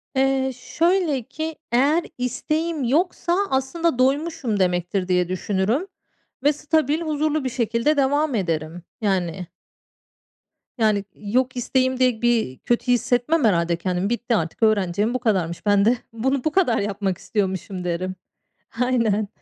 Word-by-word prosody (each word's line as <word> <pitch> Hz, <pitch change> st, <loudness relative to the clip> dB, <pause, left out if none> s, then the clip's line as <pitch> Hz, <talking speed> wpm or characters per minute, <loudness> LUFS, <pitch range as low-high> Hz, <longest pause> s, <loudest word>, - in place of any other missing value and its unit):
Eee, 265 Hz, 0 st, +2 dB
şöyle 325 Hz, 0 st, 0 dB
ki, 315 Hz, +5 st, -5 dB, 0.2 s
eğer 285 Hz, +8 st, +3 dB
isteğim 305 Hz, +5 st, -2 dB
yoksa 340 Hz, +6 st, +1 dB
aslında 265 Hz, +2 st, 0 dB
doymuşum 270 Hz, -5 st, +1 dB
demektir 180 Hz, +1 st, 0 dB
diye 180 Hz, -1 st, +1 dB
düşünürüm 205 Hz, -, -1 dB, 0.6 s
ve 290 Hz, -, +4 dB
stabil, 305 Hz, +1 st, 0 dB
huzurlu 310 Hz, -2 st, 0 dB
bir 260 Hz, -, -1 dB
şekilde 235 Hz, +5 st, 0 dB
devam 285 Hz, 0 st, +2 dB
ederim, 165 Hz, -2 st, -2 dB, 0.2 s
yani. 185 Hz, -4 st, -1 dB, 1.3 s
Yani, 215 Hz, -3 st, +2 dB
yok 250 Hz, +5 st, -1 dB
isteğim 260 Hz, +1 st, 0 dB
diye 250 Hz, -3 st, +2 dB
bir 230 Hz, -, +1 dB
kötü 240 Hz, +1 st, 0 dB
hissetmem, 245 Hz, +5 st, +2 dB
herhâlde, 170 Hz, -5 st, +2 dB
kendimi. 180 Hz, +3 st, -1 dB
”Bitti 240 Hz, 0 st, 0 dB
artık, 165 Hz, +4 st, -2 dB
öğreneceğim 205 Hz, 0 st, +2 dB
bu 255 Hz, -, -1 dB
kadarmış. 185 Hz, -8 st, -1 dB
Ben 205 Hz, -1 st, +4 dB
de 240 Hz, +2 st, +4 dB, 0.2 s
bunu 260 Hz, +3 st, 0 dB
bu 310 Hz, -, +1 dB
kadar 325 Hz, -10 st, +2 dB
yapmak 200 Hz, -2 st, -2 dB
istiyormuşum,” 190 Hz, -2 st, -3 dB
derim. 180 Hz, +2 st, -2 dB, 0.7 s
Aynen. 230 Hz, -5 st, +1 dB
240 Hz, 130 wpm, -23 LUFS, 195-280 Hz, 1.3 s, ve